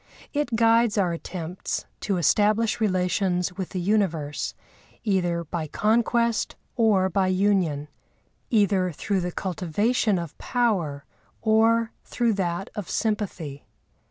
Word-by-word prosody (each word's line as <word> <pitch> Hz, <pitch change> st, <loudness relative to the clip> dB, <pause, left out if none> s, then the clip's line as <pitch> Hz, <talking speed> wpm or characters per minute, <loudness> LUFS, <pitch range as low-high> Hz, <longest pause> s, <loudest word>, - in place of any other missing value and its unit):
It 290 Hz, -5 st, 0 dB
guides 230 Hz, -1 st, +4 dB
our 180 Hz, -4 st, +2 dB
attempts 170 Hz, +1 st, -4 dB
to 195 Hz, -3 st, -1 dB
establish 215 Hz, +6 st, +2 dB
relations 185 Hz, -2 st, +1 dB
with 190 Hz, -2 st, -4 dB
the 185 Hz, -, -4 dB
universe 175 Hz, -7 st, 0 dB, 0.5 s
either 175 Hz, -5 st, +1 dB
by 160 Hz, 0 st, -4 dB
conquest 235 Hz, +4 st, +1 dB, 0.2 s
or 215 Hz, -6 st, +3 dB
by 190 Hz, +1 st, +1 dB
union, 185 Hz, -6 st, +1 dB, 0.6 s
either 200 Hz, -5 st, +2 dB
through 190 Hz, +5 st, -1 dB
the 180 Hz, 0 st, -2 dB
cultivation 195 Hz, +5 st, 0 dB
of 170 Hz, -3 st, -5 dB
power 185 Hz, -, 0 dB, 0.4 s
or 225 Hz, +1 st, +3 dB
through 235 Hz, -2 st, 0 dB
that 180 Hz, -1 st, -2 dB
of 205 Hz, -4 st, -6 dB
sympathy. 185 Hz, -10 st, -2 dB
195 Hz, 115 wpm, -25 LUFS, 175-220 Hz, 0.6 s, guides